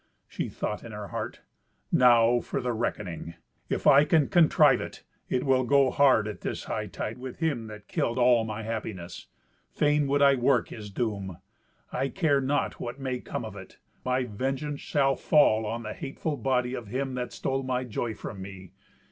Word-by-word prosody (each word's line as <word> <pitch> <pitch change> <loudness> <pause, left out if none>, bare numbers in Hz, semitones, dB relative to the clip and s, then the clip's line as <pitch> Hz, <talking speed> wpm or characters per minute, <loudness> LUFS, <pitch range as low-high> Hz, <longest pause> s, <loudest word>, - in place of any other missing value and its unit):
She - - -4
thought 105 - -4
in 115 - -9
her 105 -2 -6
heart, - - -5 0.5
"Now 120 -1 +5
for - - -3
the 125 -1 -1
reckoning! 90 -7 -4 0.3
If - - -2
I 140 +1 +8
can 150 -1 +3
contrive 155 -6 +5
it, - - -8 0.3
it 125 - 0
will 130 -1 +3
go 135 +1 +4
hard 130 -7 +4
at 105 - -6
this - - -4
hightide - - -4
with 130 -1 -7
him 140 -9 -1
that 105 -1 -11
killed 115 - -1
all 120 -2 +5
my 110 0 -5
happiness. 105 -5 -5 0.4
Fain 150 -1 +2
would 140 +1 +3
I 140 0 +7
work 125 -2 +2
his 105 -2 -8
doom. 100 -4 -3 0.5
I 135 +1 -1
care 145 -6 +2
not 140 +2 -1
what 120 +3 -5
may 130 -2 -2
come 120 - -5
of 110 -2 -8
it: 95 -1 -11 0.3
my 130 0 +1
vengeance 135 +6 -3
shall 135 -2 +2
fall 110 -9 +3
on 115 +2 -3
the 110 0 -5
hateful 145 +2 -4
body 125 -1 0
of 120 -4 -5
him 130 +4 -2
that 125 -1 -3
stole 135 0 -2
my 130 -1 -1
joy 115 -1 -3
from 95 - -7
me. 95 -2 -9
125 Hz, 180 wpm, -27 LUFS, 110-135 Hz, 0.5 s, I